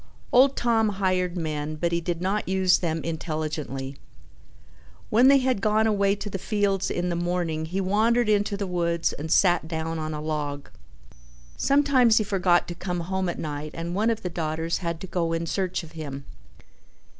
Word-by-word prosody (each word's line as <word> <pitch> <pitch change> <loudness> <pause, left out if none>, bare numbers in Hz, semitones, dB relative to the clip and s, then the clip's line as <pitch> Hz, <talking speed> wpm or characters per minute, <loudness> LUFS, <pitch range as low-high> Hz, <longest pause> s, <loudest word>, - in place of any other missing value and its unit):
Old 265 +2 +5
Tom 225 -2 +2
hired 185 -2 0
men 155 -2 -3
but 170 +2 -1
he 170 0 0
did 170 0 -3
not 195 +1 -1
use 190 -1 +3
them 165 -2 -2
intelligently. 155 -4 -4 1.1
When 235 +4 +6
they 275 0 +7
had 255 -6 0
gone 215 +1 +2
away 200 -2 +2
to 205 - -7
the 195 -1 -4
fields 200 -1 0
in 175 0 -1
the 170 - -1
morning 170 -2 -1
he 185 +4 -2
wandered 220 +5 +2
into 205 -1 +1
the 200 - -2
woods 170 -2 0
and 155 +3 -6
sat 175 -4 +3
down 160 0 -3
on 155 0 -3
a - - -4
log. 150 -2 -4 0.9
Sometimes 275 -5 +4
he 215 - +4
forgot 185 -3 +2
to - - -3
come 180 0 -4
home 190 +1 -2
at - - -4
night 150 0 -5
and 170 +1 -4
one 215 +5 +1
of 225 -1 -2
the 180 - -2
daughters 160 0 -2
had 170 -2 -3
to - - -5
go 170 -2 -1
in 165 0 -1
search 185 +1 -2
of 160 - -12
him. 140 -4 -7
175 Hz, 185 wpm, -25 LUFS, 160-200 Hz, 1.1 s, they